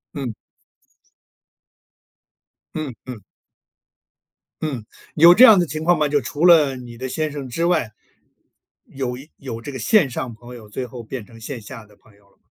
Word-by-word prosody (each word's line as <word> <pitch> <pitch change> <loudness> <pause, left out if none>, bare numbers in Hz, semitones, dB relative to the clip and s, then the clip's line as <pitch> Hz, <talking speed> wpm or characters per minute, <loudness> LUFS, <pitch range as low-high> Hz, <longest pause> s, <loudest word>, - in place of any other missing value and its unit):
嗯。 130 -6 -4 2.4
嗯， 155 -5 -4
嗯。 125 -3 -7 1.4
嗯， 135 -8 -4 0.3
有 170 +3 +8
这 245 - +7
样 220 -6 +9
的 175 - +2
情 155 0 -5
况 175 +1 +3
吗？ 150 -1 +2
就 145 0 +1
除 145 +7 -2
了 155 -6 +6
你 120 -2 -10
的 130 +2 -5
先 155 +3 -2
生 140 -3 -7
之 165 +7 -1
外， 160 -11 +1 0.9
有 130 -2 -5
一 140 +4 -13
有 120 -4 -7
这 130 - -7
个 130 - -7
线 175 - +3
上 125 -1 -5
朋 120 +2 -12
友， 110 -3 -13
最 125 +5 -4
后 120 0 -9
变 115 0 -7
成 115 +1 -16
线 120 +3 -6
下 110 +1 -10
的 105 0 -22
朋 105 - -24
友 100 -1 -27
了 - - -32
吗？ - - -47
130 Hz, 190 characters per minute, -21 LUFS, 120-155 Hz, 2.4 s, 样